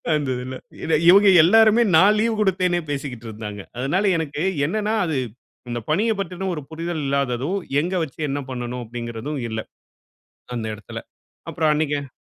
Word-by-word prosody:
அந்த 145 -3 -1
இதுல. 130 +1 -6 0.3
இட 165 - -2 0.2
இவங்க 200 +2 +7
எல்லாருமே 220 +5 +6
நான் 205 +5 +5
லீவ் 230 -1 +1
குடுத்தேனே 180 -3 +1
பேசிகிட்டுருந்தாங்க. 110 -7 -6 0.2
அதுனால 145 +11 0
எனக்கு 150 -2 -3 0.3
என்னனா, 215 +4 -1
அது 155 -4 -1 0.5
இந்த 120 - -2
பணியப் 215 +4 +1
பத்தின 190 0 -3
ஒரு 150 - -5
புரிதல் 165 -1 -4
இல்லாததும், 140 +5 0 0.2
எங்க 180 +3 -3
வச்சி 155 +1 -8
என்ன 140 +1 -2
பண்ணணும் 125 0 -4
அப்டீங்குறதும் 120 +5 -5
இல்ல. 110 0 -3 1.0
அந்த 115 -2 -3
இடத்தில 105 - -8 0.5
அப்புறம் 155 -2 +1
அன்னைக்கு, 145 -2 -1
150 Hz, 140 wpm, -22 LUFS, 125-190 Hz, 1.0 s, இவங்க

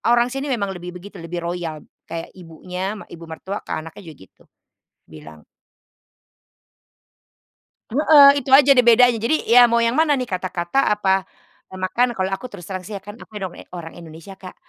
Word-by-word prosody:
orang 240 +1 +1
sini 270 +2 -4
memang 205 -8 -2
lebih 180 -1 -8
begitu, 190 +3 -11
lebih 170 +1 -6
royal, 170 -3 -5 0.2
kayak 165 0 -7
ibunya, 180 +4 -6 0.2
ibu 170 0 -11
mertua 190 +5 -6
ke - - -7
anaknya 165 +5 -9
juga 160 - -10
gitu, - - -23 0.7
bilang 75 -1 -14 2.5
Heeh, 290 +2 +7
itu 270 0 -6
aja 280 0 +6
deh 250 - +5
bedanya, 240 0 +6
jadi 230 +8 0 0.2
ya 245 - +9
mau 235 0 +2
yang 230 +2 +1
mana 315 -2 +3
nih, 255 -3 -3
kata-kata 180 +3 -3 0.2
apa, 190 -2 0 0.4
eee, 185 - -11
makan? 240 +6 0
Kalau 190 0 -1
aku 195 +6 -4
terus 195 -5 -11
terang 185 -2 -6
sih 210 - -8
ya 195 - -9
kan 205 +1 -10
aku 220 - -15
dong 185 -2 -4 0.2
orang 165 -2 -8
Indonesia 165 +2 -12
Kak, 185 -1 -11
190 Hz, 175 wpm, -21 LUFS, 170-240 Hz, 2.5 s, ya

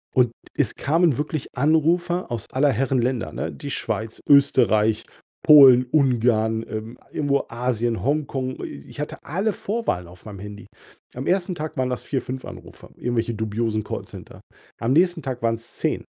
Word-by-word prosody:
Und 125 -2 +4 0.2
es - - 0
kamen 160 -2 +2
wirklich 150 -1 -3
Anrufe 165 +5 +2
aus 115 -3 -3
aller 140 +2 +3
Herren 130 +1 +1
Länder, 120 -11 -1
ne? - - -3
Die 140 - -8
Schweiz, 110 -3 -3
Österreich, 110 -6 +4 0.4
Polen, 135 -4 +9
Ungarn, 115 -5 +2
ähm, 110 +2 -6
irgendwo 140 -1 0
Asien, 120 -1 -1
Hongkong. 135 -2 -2
I 70 -1 -7
ich - - -12
hatte 150 - -4
alle 195 +7 -1
Vorwahlen 200 - -2
auf 90 +4 -16
meinem 100 -3 -9
Handy. 105 0 -9 0.5
Am 130 - -5
1. 180 0 +1
Tag 155 -1 -6
waren 130 0 0
das 125 - -3
4, 135 - -2
5 130 0 -6
Anrufe, - - -11
irgendwelche 120 -1 -1
dubiosen 110 0 -1
Callcenter. - - -8 0.4
Am 120 +3 +1
nächsten 175 0 +3
Tag 130 -2 -5
waren's 115 0 -2
10. - - -1
125 Hz, 160 wpm, -23 LUFS, 115-150 Hz, 0.5 s, Polen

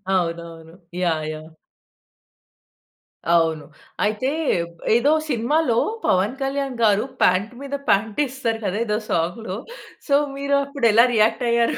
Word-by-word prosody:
అవునవును. 165 -2 -3 0.3
Yeah! 160 -3 0
Yeah! 155 +1 -10 1.9
అవును. 160 -3 +1 0.4
అయితే 215 +5 0 0.7
ఏదో 275 +5 +3 0.2
సినిమాలో 245 +1 +1 0.3
పవన్ 195 +8 +2
కళ్యాణ్ 270 -1 -2
గారు 210 -1 +4 0.2
పాంట్ 195 +6 +2
మీద 280 0 -4
పాంట్ 210 +3 +1
ఎస్తారు 240 -4 -3
గదా! 190 - -1
ఏదో 210 -1 0
సాంగ్‌లో 185 +4 -2 0.5
సో 280 - 0 0.2
మీరు 280 0 0
అప్పుడు 280 -4 0
ఎలా 235 +2 +7
రియాక్ట్ 225 +3 +2
అయ్యారు? 235 0 +2
220 Hz, 115 wpm, -22 LUFS, 175-260 Hz, 1.9 s, ఎలా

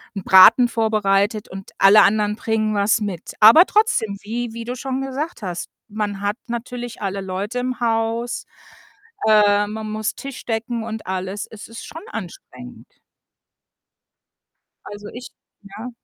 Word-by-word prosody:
'n 195 - -5
Braten 190 +7 +7
vorbereitet 215 -2 0
und 190 +1 -10
alle 200 +2 +7
anderen 210 +1 +2
bringen 220 -1 -1
was 205 +2 +2
mit. 195 -5 -5
Aber 230 - +8
trotzdem, 385 - +1
wie 230 +2 -4
wie 230 - -6
du 245 +2 -5
schon 265 +1 -4
gesagt 270 +3 -5
hast, 180 -3 -5 0.2
man 205 -2 -4
hat 205 +2 -1
natürlich 240 0 -6
alle 195 -1 -3
Leute 195 +6 -4
im 250 0 -3
Haus, 230 0 -1 0.8
äh, 205 -1 +4
man 215 +1 -6
muss 215 0 -3
Tisch 275 -1 -9
decken 230 0 -3
und 220 -1 -6
alles. 190 +2 -4
Es 220 -1 -11
ist 230 +1 -10
schon 325 - -9
anstrengend. 125 - -10 2.0
Also, 205 0 -9
ich 245 +2 -9 0.3
ja? 210 +5 -9
215 Hz, 140 wpm, -21 LUFS, 205-235 Hz, 2.0 s, Aber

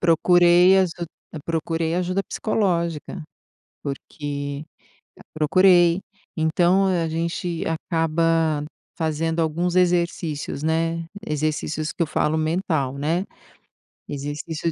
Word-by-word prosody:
procurei 175 +2 +5
aju 185 -3 +2 0.5
procurei 165 0 -1
ajuda 180 +2 0
psicológica, 175 -6 -1 0.6
porque 145 0 -5 0.7
procurei, 175 +2 +4 0.4
então 175 +4 +3
a 170 -3 +1
gente 170 +1 -2
acaba 165 -1 +1 0.3
fazendo 160 +1 -1
alguns 170 +3 0
exercícios, 170 -5 0
né, 165 +1 0 0.2
exercícios 155 +1 -2
que - - -2
eu - - +1
falo 155 +1 0
mental, 155 -4 -1
né, 165 +6 0 0.8
exercício, 150 +3 -4
165 Hz, 90 wpm, -23 LUFS, 155-175 Hz, 0.8 s, procurei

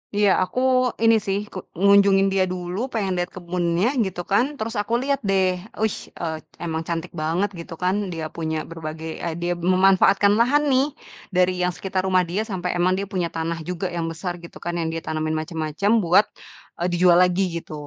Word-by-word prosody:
Iya 205 -1 +4
aku 185 - -3 0.5
ini 225 0 +6
sih 195 -1 0 0.2
ke - - -6 0.2
ngunjungin 200 -1 +5
dia 195 -1 +3
dulu 180 +1 -4
pengen 200 -4 0
liat 175 +1 -1
kebunnya 175 0 -1 0.2
gitu 180 -2 -4
kan 255 +8 +2
terus 225 -2 -4
aku 210 +3 -5
liat 275 0 0
deh 190 -1 +3 0.4
wih 220 -2 +1 0.2
eee, 160 -2 -2 0.3
emang 160 -1 -2
cantik 170 +1 -4
banget 170 +6 0
gitu 170 - -8
kan 185 +2 +2 0.2
dia 160 -1 -4
punya 160 -1 -2
berbagai 160 0 -6
e - - -1
dia 175 +1 0
memanfaatkan 190 +3 +4
lahan 280 +6 +4
nih, 260 +1 +4 0.4
dari 185 -1 +2
yang 180 - +2
sekitar 185 +1 -2
rumah 185 -1 +3
dia 180 +5 -2
sampe 180 -3 -3
emang 185 +1 +2
dia 200 - -2
punya 175 -3 0
tanah 165 0 -3
juga 180 +1 -3
yang 165 -1 -2
besar 175 +2 -4
gitu 170 - -11
kan 175 - -4
yang 160 - -1
dia 165 0 -4
tanemin 155 0 -2
macem-macem 160 +5 -2
buat, 180 +3 +5 0.6
eee, 175 - +1
dijual 175 0 +4
lagi 180 +1 +3 0.2
gitu, - - -11
180 Hz, 190 wpm, -23 LUFS, 170-195 Hz, 0.6 s, ini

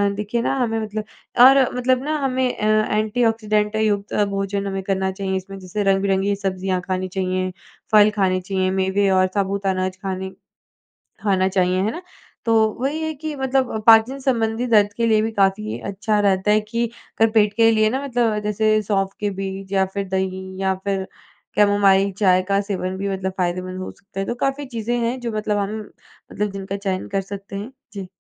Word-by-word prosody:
देखिए 210 +3 -2
ना 240 - 0
हमें 225 -3 0
मतलब 215 0 -4 0.4
और 270 +1 +8 0.2
मतलब 255 +1 +1
ना 305 +1 -1
हमें 260 -2 0
अ, 215 0 +2
एंटीऑक्सीडेंट 215 -1 +1
युक्त 210 -2 0 0.2
भोजन 195 0 -2
हमें 195 0 -3
करना 190 0 0
चाहिए। 190 0 -3
इसमें 195 +1 -8
जैसे 185 +3 -3
रंग-बिरंगी 195 0 +2
सब्ज़ियाँ 190 -1 -2
खानी 185 0 -2
चाहिए 185 0 -2 0.4
फल 215 -1 +7
खाने 185 -2 +2
चाहिए 185 0 -1
मेवे 190 +1 +1
और 185 0 +4
साबुत 200 0 -1
अनाज 185 0 -1
खाने 190 0 -3 0.9
खाना 190 -2 +2
चाहिए 185 0 +1
है 210 - 0
ना, 345 - -7 0.4
तो 230 - +2 0.3
वही 290 +4 -1
है 315 0 -2
कि 310 +1 -5
मतलब 265 -4 -1
पाचन 225 +4 +6
संबंधी 235 -3 0
दर्द 205 -3 +4
के 235 - +1
लिए 215 -1 +4
भी 225 +1 -1
काफ़ी 205 +1 0
अच्छा 210 +2 0
रहता 200 0 +2
है 215 +1 +4
कि 230 +3 -2 0.3
अगर 225 0 +5
पेट 210 -2 +3
के 225 -1 +6
लिए 215 -1 +3
ना 260 +4 -2
मतलब 240 -5 0
जैसे 215 +1 +2
सौंफ 195 -1 0
के 205 - 0
बीज 195 0 -5
या 190 -1 +3
फिर 200 -1 -3
दही 190 0 -2 0.2
या 190 0 +2
फिर 195 -1 -1 0.5
कैमोमाइल 200 -1 +4
चाय 185 -3 +4
का 200 0 +3
सेवन 190 -2 -3
भी 200 +1 -2
मतलब 190 -1 -2
फ़ायदेमंद 185 +1 -2
हो - - -5
सकता 195 -1 -11
है 195 - -1
तो 240 - -2
काफ़ी 275 +3 -1
चीज़ें 240 -1 -3
हैं। 240 +2 -1
जो 240 -2 -4
मतलब 215 -1 -1
हम 205 +2 -2 0.5
मतलब 210 0 -2
जिनका 195 0 -5
चयन 195 -2 -3
कर 195 -1 0
सकते 195 0 -8
हैं। 205 +6 -6 0.2
जी। 195 -3 -6
200 Hz, 185 wpm, -21 LUFS, 190-220 Hz, 0.9 s, और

